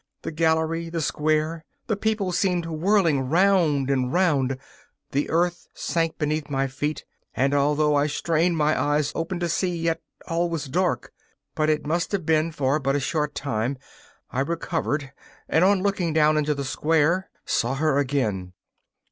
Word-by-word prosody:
The - - -4
gallery, 160 +1 +1
the 165 0 -3
square, 155 +1 0 0.2
the 215 - 0
people 210 -2 -1
seemed 180 -1 +1
whirling 165 -5 +1
round 165 -6 +3
and 130 -2 0
round; 140 -8 +2 0.5
the 140 +2 0
earth 175 +1 0
sank 165 -1 -1
beneath 150 -1 -1
my 135 -1 0
feet, 145 +3 -3 0.3
and, 135 +2 +2
although 150 +1 +2
I 145 +1 +3
strained 165 +3 +1
my 155 0 +2
eyes 145 0 +1
open 170 +2 -3
to 175 - +1
see, 180 +2 0
yet 165 0 -1 0.3
all 170 +1 0
was 165 -3 -3
dark. 175 +7 -1 0.4
But 155 0 +1
it 155 -1 0
must 170 +6 -1
have 190 -5 -1
been 160 +1 +2
for 145 -1 0
but 135 -1 0
a - - +2
short 150 +1 -1
time; 125 0 -2 0.5
I 125 - -2
recovered, 150 -2 -2 0.4
and, 160 - +3
on 190 0 +4
looking 190 -5 0
down 155 0 +4
into 150 0 +1
the 140 0 -4
square, 160 +6 +1 0.2
saw 120 +3 0
her 145 0 +2
again. 110 -10 -1
155 Hz, 165 wpm, -24 LUFS, 145-170 Hz, 0.5 s, on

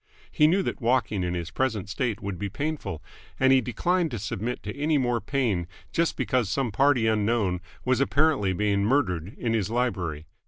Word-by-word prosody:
He 150 -2 +4
knew 190 +5 +3
that - - -4
walking 115 -4 +1
in 90 0 -1
his 85 -1 -4
present 110 -7 -1
state 115 0 -2
would 100 -3 -4
be 100 0 -2
painful, 105 - -4 0.4
and 130 0 +5
he 130 - +5
declined 170 +9 0
to 120 - -4
submit 110 +3 -4
to 105 - -5
any 150 +2 +1
more 120 -3 +1
pain 105 -8 0 0.2
just 170 0 0
because 125 -6 0
some 125 0 0
party 135 0 +3
unknown 105 -4 +1 0.2
was 130 0 +2
apparently 140 -8 +2
being 100 +1 +1
murdered 100 - 0
in 115 -2 -1
his 105 -3 0
library. 95 -11 -1
115 Hz, 185 wpm, -26 LUFS, 100-135 Hz, 0.4 s, and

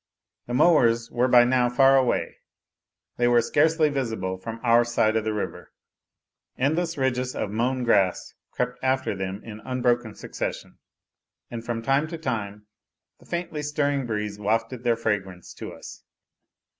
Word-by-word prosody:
The 120 - -2
mowers 120 -7 +4
were 125 +1 +2
by 120 -1 +7
now 125 0 +2
far 135 +2 +5
away; 130 -2 +1 0.8
they 120 - +2
were 120 0 +5
scarcely 155 +6 +3
visible 115 -9 -2
from 115 +4 -7
our 120 0 +5
side 115 -2 +1
of 110 - +1
the 110 - -1
river; 105 -1 -5 0.9
endless 165 +5 0
ridges 130 -1 -1
of 105 - -3
mown 125 +4 0
grass 100 -6 +1 0.2
crept 125 0 -3
after 130 -2 0
them 95 +1 -5
in 110 -2 -9
unbroken 120 -2 -1
succession, - - -6 0.7
and 115 -1 -5
from 115 -1 -4
time 135 +5 +2
to 165 +1 -6
time 105 -8 -4 0.5
the - - -20
faintly 170 -3 -3
stirring 145 -2 -1
breeze 105 -2 -3
wafted 115 +4 -1
their 120 -1 +2
fragrance 95 -5 -3
to - - -8
us. - - -11
120 Hz, 150 wpm, -25 LUFS, 110-130 Hz, 0.9 s, by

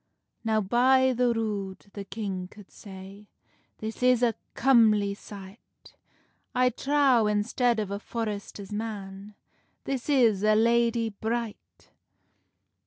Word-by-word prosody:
"Now, 220 -1 +1
by 260 +5 +3
the 245 0 +2
rood," 210 -5 -3
the 200 - -6
king 195 -3 -5
coud 205 +1 -16
say, 195 0 -12 0.5
"This 220 +2 -6
is 250 -1 +4
a 235 -2 +3 0.2
comely 220 -6 +4
sight; 200 +1 -13 0.6
I 250 0 +3
trow, 270 -3 +2
instead 225 +3 +1
of 205 -2 -3
a 200 - -3
forrester's 210 -3 -5
man, 205 -2 -6 0.5
This 270 0 -4
is 235 -8 +3
a 215 0 +4
lady 230 0 +2
bright!" 220 +2 -5
220 Hz, 115 wpm, -27 LUFS, 200-240 Hz, 0.6 s, is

